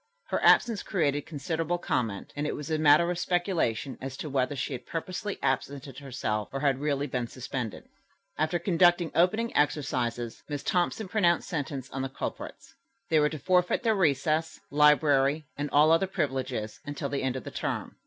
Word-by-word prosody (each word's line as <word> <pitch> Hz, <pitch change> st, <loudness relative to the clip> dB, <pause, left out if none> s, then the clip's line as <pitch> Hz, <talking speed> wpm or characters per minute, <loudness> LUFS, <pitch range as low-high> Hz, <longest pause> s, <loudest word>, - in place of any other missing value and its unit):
Her -, -, -1 dB
absence 230 Hz, -4 st, +5 dB
created 145 Hz, -7 st, 0 dB
considerable 160 Hz, +3 st, -2 dB
comment, 115 Hz, -, -2 dB
and 145 Hz, +1 st, -2 dB
it -, -, -2 dB
was 150 Hz, +2 st, -6 dB
a 155 Hz, -, +1 dB
matter 155 Hz, +3 st, +5 dB
of 175 Hz, -, -3 dB
speculation 175 Hz, -, -1 dB
as 135 Hz, 0 st, -6 dB
to 150 Hz, -, -5 dB
whether 135 Hz, +1 st, 0 dB
she 140 Hz, -, -3 dB
had 125 Hz, -, -7 dB
purposely 185 Hz, +5 st, -4 dB
absented 135 Hz, 0 st, -2 dB
herself 120 Hz, -6 st, -3 dB
or 135 Hz, -, -3 dB
really 140 Hz, +1 st, -1 dB
had 140 Hz, -, -9 dB
been 125 Hz, -2 st, -1 dB
suspended. 125 Hz, -3 st, -5 dB, 0.5 s
After 155 Hz, +3 st, 0 dB
conducting 175 Hz, -1 st, +3 dB
opening 215 Hz, +7 st, +2 dB
exercises, 120 Hz, -5 st, 0 dB
Miss 145 Hz, -1 st, -4 dB
Thompson 180 Hz, +4 st, 0 dB
pronounced 180 Hz, -4 st, +2 dB
sentence 140 Hz, -5 st, -4 dB
on 135 Hz, -, -3 dB
the 135 Hz, -, -2 dB
culprits. 135 Hz, -, -7 dB, 0.4 s
They 160 Hz, -, +5 dB
were 150 Hz, 0 st, +3 dB
to 155 Hz, -, -5 dB
forfeit 180 Hz, -, +2 dB
their 225 Hz, -2 st, +3 dB
recess, 160 Hz, -3 st, +1 dB
library 150 Hz, 0 st, +4 dB
and 145 Hz, 0 st, -3 dB
all 150 Hz, +2 st, +5 dB
other 165 Hz, +4 st, +4 dB
privileges 130 Hz, -, -3 dB
until 145 Hz, -1 st, -4 dB
the 140 Hz, -, -2 dB
end 130 Hz, -1 st, -1 dB
of 130 Hz, -, -5 dB
the -, -, -7 dB
term. -, -, -4 dB
145 Hz, 175 wpm, -28 LUFS, 135-170 Hz, 0.5 s, absence